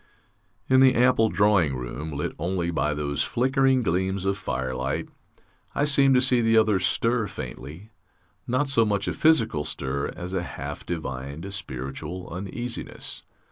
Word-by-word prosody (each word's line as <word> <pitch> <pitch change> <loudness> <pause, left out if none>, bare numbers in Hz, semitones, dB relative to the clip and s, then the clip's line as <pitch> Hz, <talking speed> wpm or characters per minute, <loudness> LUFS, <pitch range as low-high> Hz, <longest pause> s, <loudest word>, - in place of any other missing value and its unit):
In 130 0 +5
the 130 -1 +6
ample 120 -2 +4
drawing 100 -10 +3
room, 65 +5 -5
lit 75 0 -3
only 85 -1 -1
by 75 -2 0
those 70 -1 -2
flickering 130 +1 +2
gleams 95 0 -1
of 95 0 +1
firelight, 65 -10 -3 0.7
I 145 - +2
seemed 140 -2 +5
to 125 - +5
see 125 -2 +3
the 115 0 +3
others 110 -4 +3
stir 115 -2 +1
faintly 75 - -8 0.6
not 130 +4 +1
so 135 -4 +3
much 100 -2 0
a - - 0
physical 115 - +3
stir 70 -2 -3
as 90 +1 -6
a 95 - 0
half 75 -4 -7
divined 75 +2 -5
spiritual 70 +4 -5
uneasiness. 110 +7 -5
95 Hz, 145 wpm, -25 LUFS, 75-120 Hz, 0.7 s, the